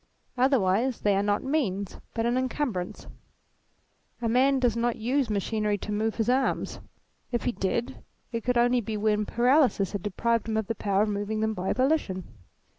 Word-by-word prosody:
Otherwise 245 -2 +2
they 205 -1 +3
are 195 - +2
not 205 0 0
means, 215 - -1 0.2
but 225 -1 0
an 240 +1 +1
incumbrance. 255 -8 -2 1.1
A 235 - -1
man 260 +4 +3
does 245 -4 +2
not 235 0 0
use 250 +3 0
machinery 210 0 0
to 210 - -6
move 215 +1 0
his 225 -1 -1
arms. 260 +2 0 0.5
If 240 - -1
he - - +1
did, 235 +5 -2 0.3
it 230 -2 -3
could 250 0 +1
only 245 +1 +3
be 220 0 -4
when 210 0 +1
paralysis 245 - +3
had 200 - -3
deprived 230 +3 0
him 220 - 0
of 220 - 0
the 230 - -2
power 200 -2 +1
of 215 - -1
moving 205 +1 -2
them 220 0 +1
by 185 -2 -2
volition. 255 -9 0
225 Hz, 180 wpm, -27 LUFS, 205-250 Hz, 1.1 s, they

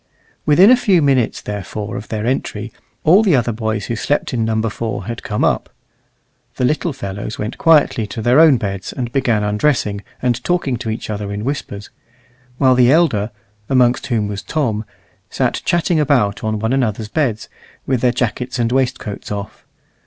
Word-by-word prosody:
Within 180 +9 +7
a - - +8
few 200 -7 +3
minutes 135 -6 +1
therefore 105 0 -5
of 105 - -6
their 110 -1 -3
entry, 115 -3 -2 0.3
all 180 +7 +6
the 195 -8 +3
other 120 -2 +1
boys 110 -2 -2
who 115 - -3
slept 145 +5 -1
in 115 -2 0
Number 110 0 0
4 110 -3 -4
had 115 0 -5
come 105 - -2
up. - - 0 0.9
The 125 - 0
little 155 +5 0
fellows 100 -4 -6
went 105 +3 -5
quietly 145 -8 +4
to 110 - -6
their 125 +5 +4
own 160 -5 +7
beds, 100 -4 -4
and 120 -2 -4
began 120 -6 +1
undressing, 105 -1 0 0.2
and 125 -1 -1
talking 175 -8 0
to 115 - -5
each 110 0 -4
other 100 -1 -4
in 100 +1 -4
whispers; 105 -7 -5 0.7
while 130 -1 +4
the 125 0 +5
elder, 140 -10 +2 0.4
amongst 125 0 +2
whom 115 -5 0
was 100 -1 -4
Tom, 115 -8 -2 0.4
sat - - -1
chatting 175 -1 +1
about 130 -9 +1
on 110 0 -1
one 110 +4 -1
another's 110 -5 -1
beds, 115 -4 -1 0.4
with 130 -3 0
their 125 - +3
jackets 125 +1 -2
and 120 -1 0
waistcoats 130 -6 -2
off. 100 0 -6
120 Hz, 175 wpm, -18 LUFS, 105-135 Hz, 0.9 s, a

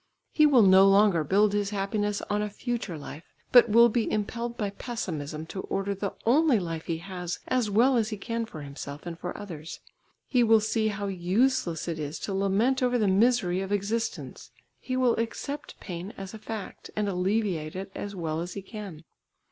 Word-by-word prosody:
He 305 -1 +5
will 260 -6 +6
no 190 0 +7
longer 195 -4 +4
build 200 +6 +3
his 205 -1 0
happiness 205 0 -1
on 205 0 0
a 210 - -2
future 220 -5 -4
life, 150 +2 -9 0.3
but 245 -2 +7
will 235 +2 +7
be 235 0 0
impelled 235 +3 -2
by 205 -2 -2
pessimism 160 - -5
to 190 +4 -6
order 195 +1 -2
the 195 0 -4
only 280 +2 +4
life 165 -3 -5
he 165 - -1
has 180 0 -5
as 250 -4 +1
well 240 +6 +4
as 220 -2 +1
he 215 - -4
can 230 +2 -3
for 155 -8 -8
himself 140 +1 -8
and 170 -1 -6
for 175 - -5
others. 165 -6 -8 0.5
He 250 - +2
will 225 -1 +6
see 220 +1 0
how 205 -1 -3
useless 190 - 0
it 165 -2 -3
is 150 +1 -4
to 200 - -3
lament 200 +7 +1
over 250 -1 +2
the 215 -3 +2
misery 190 -2 +3
of 195 +1 -5
existence; 205 +3 -3 0.3
he 255 -1 -3
will 250 -2 +3
accept 255 +5 -4
pain 180 +2 -7
as 195 +1 -7
a 220 - -8
fact, 215 -2 -7
and 210 -1 0
alleviate 185 -4 -1
it 195 +1 -6
as 205 0 -6
well 160 -3 -2
as 175 +1 -5
he 200 - -6
can. 195 -7 -8
200 Hz, 195 wpm, -27 LUFS, 180-225 Hz, 0.5 s, no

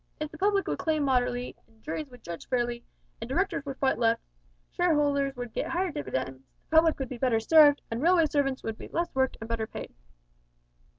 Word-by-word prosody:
If 305 0 -4
the 315 - -10
public 400 0 +2
would - - -2
claim 310 -2 0
moderately, 250 -2 0
and 225 -1 -28
juries 310 -1 -4
would 245 -2 -15
judge 170 -1 -8
fairly, 240 -1 -1 0.4
an' 230 - -4
directors 330 +2 0
would 270 -1 -5
fight 265 -3 +1
less, 230 -1 +3 0.5
shareholders 290 -5 +1
would 245 -2 -6
git - - -2
higher 365 +1 -1
dividends, 130 - -4 0.3
the - - 0
public 320 -1 +5
would 270 -3 -4
be 250 - -7
better 245 -3 +2
served, 290 +4 +6
and 230 +2 -2
railway 340 +1 +5
servants 285 -3 0
would 225 -1 -4
be - - -8
less 340 +1 -2
worked 265 0 +1
and 225 - -7
better 225 -1 -2
paid." - - -8
270 Hz, 200 wpm, -28 LUFS, 235-310 Hz, 0.5 s, served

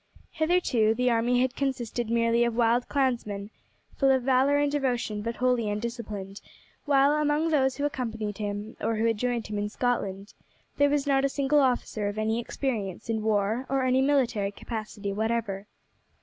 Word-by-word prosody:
Hitherto 315 -10 +2
the 250 +1 +2
army 240 +2 +2
had 260 0 0
consisted 245 -4 -2
merely 230 0 +2
of 235 -1 0
wild 240 +1 +2
clansmen, 230 -7 -1 0.4
full 275 - +3
of 260 -2 +3
valour 265 +2 +3
and 290 0 +1
devotion 245 -7 -1
but 230 +2 -3
wholly 250 -3 +1
undisciplined; 210 -3 -5 0.4
while 280 -1 +4
among 300 +1 +1
those 265 -3 +2
who 285 - -2
accompanied 225 -7 -3
him, 205 +1 -4
or 225 +1 0
who 220 +1 0
had 225 -2 +1
joined 245 -1 -1
him 210 -1 -4
in 205 0 -2
Scotland, 205 -4 -2 0.4
there 285 0 +4
was 290 0 +1
not 275 -1 +2
a 275 - +2
single 280 +1 +2
officer 245 -5 0
of 205 +1 -4
any 220 +1 0
experience 230 -6 -4
in 220 -1 -1
war 215 +4 0
or 270 0 +1
any 255 +1 +3
military 255 -8 +1
capacity 215 -2 -5
whatever. 215 -2 -2
235 Hz, 170 wpm, -27 LUFS, 215-270 Hz, 0.4 s, while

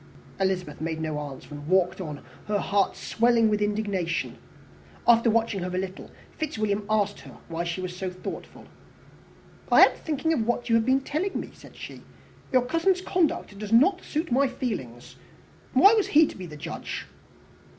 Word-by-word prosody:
Elizabeth 185 -6 -1
made 160 0 -2
no 155 -2 -2
answer, 145 -2 -8
and 145 0 -8
walked 185 +1 +2
on, 150 -5 -6 0.2
her 210 0 +1
heart 200 0 +1
swelling 230 -1 +2
with 210 0 +1
indignation. 205 -5 -1 0.7
After 235 0 +6
watching 225 -2 +1
her 180 - -3
a 180 0 -3
little, 190 0 -6 0.3
Fitzwilliam 215 -9 -1
asked 205 -2 +1
her - - -13
why 165 +1 -2
she 170 +2 -3
was 180 -1 -5
so 185 0 -3
thoughtful. 180 0 -8 1.1
"I - - +7
am - - +5
thinking 315 +1 -1
of 230 -7 0
what 240 0 -1
you 230 - +4
have 225 +1 +2
been 265 +1 +3
telling 320 +9 -2
me," - - -7
said - - -15
she. - - -9 0.5
"Your 255 -2 +3
cousin's 335 +6 +2
conduct 345 - 0
does 210 0 -6
not 355 - +5
suit 310 -1 -3
my 275 +3 +4
feelings. 130 - -5 0.6
Why 400 +3 +7
was 430 -3 +2
he 310 +2 +6
to - - -7
be 185 -2 -7
the 150 -2 -10
judge?" 155 +2 -6
210 Hz, 175 wpm, -26 LUFS, 180-260 Hz, 1.1 s, I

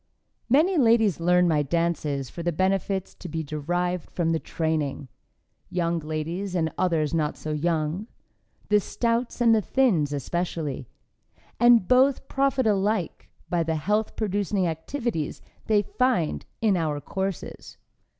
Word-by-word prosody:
Many 315 +7 +4
ladies 225 - +4
learn 180 +1 +4
my 155 -3 +2
dances 150 -3 -1
for 170 - -8
the 175 +1 0
benefits 190 +2 0
to 180 - -9
be 160 0 -3
derived 175 +4 -2
from 165 -2 -1
the 165 - +1
training; 155 -5 -2 0.6
young 170 -2 0
ladies 165 +5 -4
and 160 -2 0
others 165 -4 0
not 155 -2 0
so 155 - -5
young; 160 +5 -1 0.6
the 210 0 +5
stouts 235 +4 -1
and 230 -1 +6
the 220 - +3
thins, 190 - +2
especially, 145 -2 -3 0.7
and 240 -5 +6
both 265 +1 +3
profit 270 -2 +1
alike 205 -2 0 0.2
by 175 -1 0
the 160 0 0
health 210 +8 0
producing 205 -2 0
activities 165 - -3 0.3
they 210 -2 +3
find 245 -7 0 0.2
in 210 -3 +4
our 155 -4 -1
courses. 190 +3 -5
175 Hz, 135 wpm, -25 LUFS, 160-215 Hz, 0.7 s, and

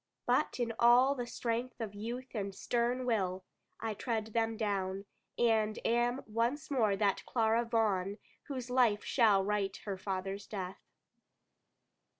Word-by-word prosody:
But - - +1
in 235 -1 0
all 245 +3 +6
the 245 -3 -4
strength 240 +2 -3
of 220 -3 -4
youth 240 +5 -6
and 200 -4 -3
stern 245 +3 0
will, 190 -6 0 0.4
I 225 -1 -2
tread 220 0 -2
them 225 -1 +1
down; 195 -2 -1 0.3
and 220 -2 +2
am 240 +3 +1
once 235 +8 -1
more 220 -7 +3
that 200 -1 +1
Clara 225 0 +2
Vaughan 205 -4 +1 0.3
whose 255 -3 -5
life 235 -5 +3
shall 210 -6 +4
right 205 -1 0
her 195 -3 -4
father's 195 +1 -4
death. 190 -3 -5
225 Hz, 140 wpm, -33 LUFS, 200-240 Hz, 0.4 s, all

